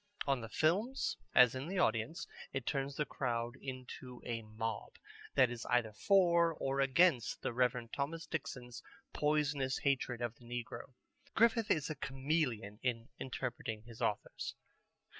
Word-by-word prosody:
On 135 -3 +1
the 115 - -6
films, 200 - +1 0.2
as 125 -1 +8
in 130 +3 -4
the 190 +2 -3
audience, 115 0 +1 0.3
it 135 -3 -2
turns 135 0 -1
the 150 - 0
crowd 120 -3 -2
into 130 -1 -7
a 115 -1 -2
mob 110 0 -4 0.4
that 130 -3 +5
is 120 -1 -5
either 120 -3 +2
for 170 - +4
or 135 -1 -1
against 135 -2 +3
the - - -1
Reverend 125 -1 +1
Thomas 160 +4 -2
Dixon's 125 -6 -5 0.3
poisonous 150 -3 +1
hatred 130 -3 0
of 120 -2 -2
the 120 - -17
negro. 120 +1 -6 0.4
Griffith 230 -1 +4
is 155 0 +2
a - - -3
chameleon 130 -7 -1
in 120 -2 -1
interpreting 120 -4 -4
his 115 +1 -12
authors. 105 -3 -2
130 Hz, 145 wpm, -35 LUFS, 120-150 Hz, 0.4 s, as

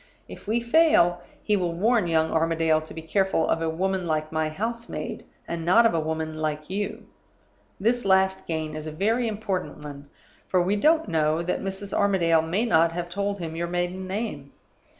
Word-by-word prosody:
If - - -12
we 230 +3 +1
fail, 235 - +4 0.2
he 210 - +2
will 175 -4 -1
warn 215 +1 +2
young 160 -1 +2
Armadale 165 -1 +2
to 155 - -11
be 160 - -7
careful 190 +1 +1
of 165 - 0
a 165 - 0
woman 185 +2 -1
like 155 -1 -1
my 160 -1 0
house 230 +8 -4
maid, - - -5 0.2
and 170 -1 -4
not 185 +8 +5
of 230 - +4
a 165 - +1
woman 160 0 -3
like 155 +1 -3
you. 205 +1 -3 0.7
This 240 +4 +1
last 190 0 +2
gain 160 -2 -3
is 155 0 -6
a - - -4
very 225 +9 0
important 195 -8 -3
one; 145 -1 -9 0.4
for 185 - +2
we 185 +3 +1
don't 315 +9 +3
know 155 0 +1
that 180 - -2
Mrs. 195 +1 -5
Armadale 170 -5 +3
may 180 +8 0
not 165 -6 +4
have 175 0 -4
told 200 +2 -2
him 165 -3 -5
your 170 +1 -2
maiden 180 +2 -2
name. 185 -9 -4
175 Hz, 190 wpm, -25 LUFS, 160-200 Hz, 0.7 s, not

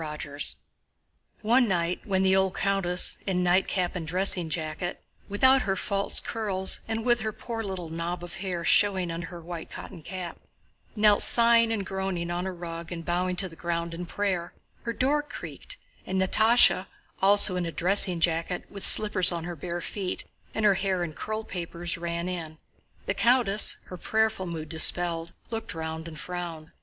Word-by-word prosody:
CHAPTER 150 -2 -7
XIII - - 0 0.9
One 240 +3 +3
night 175 -2 -1
when 190 -1 0
the 190 0 +3
old 190 0 +1
countess, 190 -3 +2
in 180 -2 0
nightcap 180 0 0
and 165 -3 -5
dressing 180 -1 0
jacket, 160 +2 -4 0.3
without 260 +6 +4
her 195 -4 -1
false 200 +1 +2
curls, 195 -4 +2
and 225 0 -3
with 240 -1 +3
her 220 0 -3
poor 225 +1 -6
little 190 -5 -6
knob 170 +2 -5
of 175 - -8
hair 175 -3 -4
showing 190 -4 +3
under 165 0 -6
her 175 0 -10
white 170 0 -8
cotton 170 - -10
cap, 180 +1 -8 0.6
knelt 210 -1 +4
sighing 230 -1 +6
and 205 -4 -2
groaning 190 -3 -4
on 175 +2 -3
a - - -3
rug 170 -1 -8
and 165 -1 -7
bowing 180 +1 -1
to 190 +1 +1
the 165 - -14
ground 170 0 -4
in 175 +1 -7
prayer, 185 -4 -3 0.3
her 230 - -2
door 280 +5 +1
creaked 295 - -8 0.3
and 190 0 -3
Natásha, 215 0 +3 0.3
also 200 -1 +5
in 180 -1 -2
a - - -4
dressing 180 0 +1
jacket 165 +1 -1
with 200 - -8
slippers 210 -4 +7
on 170 -1 -4
her 175 0 -6
bare 175 +2 -6
feet 190 +1 -5 0.3
and 220 - 0
her 205 - +5
hair 190 -1 -1
in 160 -3 -5
curlpapers, 175 -5 -5
ran 170 0 -4
in. 165 -3 -6 0.5
The - - -1
countess—her 215 -6 +2
prayerful 220 -2 -1
mood 160 -2 -6
dispelled—looked 175 +6 +2
round 160 0 -6
and 155 -2 -10
frowned. 170 -3 -7
180 Hz, 170 wpm, -26 LUFS, 170-200 Hz, 0.9 s, slippers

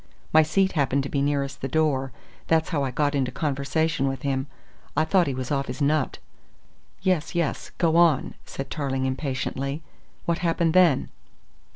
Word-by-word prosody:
My 160 - +8
seat 190 +5 +2
happened 140 -2 +1
to 140 - -5
be 140 - 0
nearest 140 -1 -1
the 135 - -1
door, 135 -2 +1 0.4
that's 160 -1 +2
how 145 -5 0
I 135 - 0
got 145 +3 0
into 135 -3 0
conversation 145 0 0
with 135 0 -3
him. 135 -1 -1 0.5
I - - +4
thought 180 +1 +3
he 135 - -1
was 130 +1 -4
off 140 -1 0
his - - -5
nut." 145 -1 +1 0.9
"Yes, 185 -4 0
yes, 170 -4 -1
go 165 -2 +2
on," 170 -6 +4
said 135 -1 -7
Tarling 135 -3 -1
impatiently. 135 +2 -2 0.4
"What 170 0 0
happened 165 -1 +1
then?" 175 -7 +4
145 Hz, 170 wpm, -25 LUFS, 135-160 Hz, 0.9 s, My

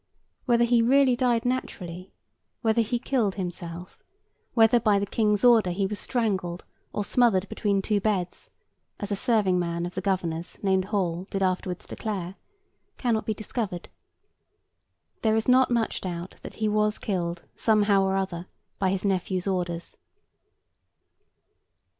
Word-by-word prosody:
Whether 240 -2 +3
he 235 0 +4
really 260 +2 +4
died 240 -1 +1
naturally; 185 -8 -4 0.5
whether 225 0 +3
he 235 +2 0
killed 235 -5 0
himself; 175 -2 -6 0.6
whether, 230 +1 +5
by 210 -2 +3
the 200 - 0
King's 210 0 +1
order, 230 -6 +6
he 190 +3 0
was 205 +1 -2
strangled, 190 -8 -1 0.3
or 205 - -2
smothered 210 -6 +3
between 200 -2 0
two 210 0 +1
beds 190 -4 -2 0.5
(as 205 0 -4
a - - +2
serving 200 -5 +2
man 170 0 -2
of 175 - -6
the 185 - -3
Governor's 175 -4 -2
named 190 -1 +2
Hall, 185 -2 -2
did 195 -1 -1
afterwards 185 -1 -1
declare), 195 -5 -4 0.6
cannot 230 -4 0
be 220 - 0
discovered. 210 -4 -4 1.3
There 220 -1 +2
is 220 - 0
not 255 +1 +5
much 235 -2 0
doubt 175 -1 -5
that - - -9
he 215 - -1
was 210 0 +1
killed, 175 -4 -3
somehow 205 -3 +3
or 190 0 +1
other, 185 -2 -3 0.3
by 190 - +2
his 190 +1 -1
nephew's 185 -1 0
orders. 175 -3 -3
200 Hz, 145 wpm, -26 LUFS, 180-225 Hz, 1.3 s, order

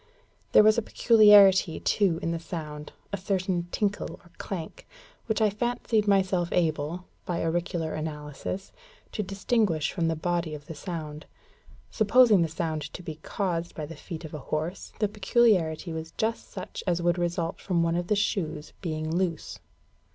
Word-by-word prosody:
There - - +8
was 215 +2 +5
a - - -1
peculiarity, 205 -6 +6
too, 190 -6 +2
in 165 - 0
the 165 - -2
sound 150 -3 -7 0.2
a - - 0
certain 185 -2 -1
tinkle, 205 -1 -1
or 170 - -20
clank, 170 -5 -6 0.4
which 220 0 0
I 210 - +3
fancied 220 -1 0
myself 185 -3 +2
able, 165 +1 0 0.2
by 175 -1 -1
auricular 165 -1 -1
analysis, 155 +4 -5 0.4
to 215 - -2
distinguish 195 -4 0
from 170 -3 0
the 165 - +1
body 170 -1 -1
of 145 - -11
the - - -7
sound. 155 -2 -6 0.6
Supposing 220 -2 +5
the 165 - +2
sound 160 -1 -3
to 180 - -8
be 160 -3 -6
caused 170 0 -3
by 155 - -4
the 165 +2 -9
feet 165 +2 -8
of 155 - -9
a 150 - -5
horse, 155 +6 -4
the 210 - +1
peculiarity 195 -6 +2
was 160 0 -6
just 225 +1 -1
such 185 - -7
as 175 -1 +2
would 175 0 +2
result 170 -1 -2
from 175 -3 +1
one 165 0 +1
of 175 0 -1
the 210 - +2
shoes 160 -7 -2
being 155 -2 -3
loose. 175 -3 -2
175 Hz, 165 wpm, -27 LUFS, 160-200 Hz, 0.6 s, There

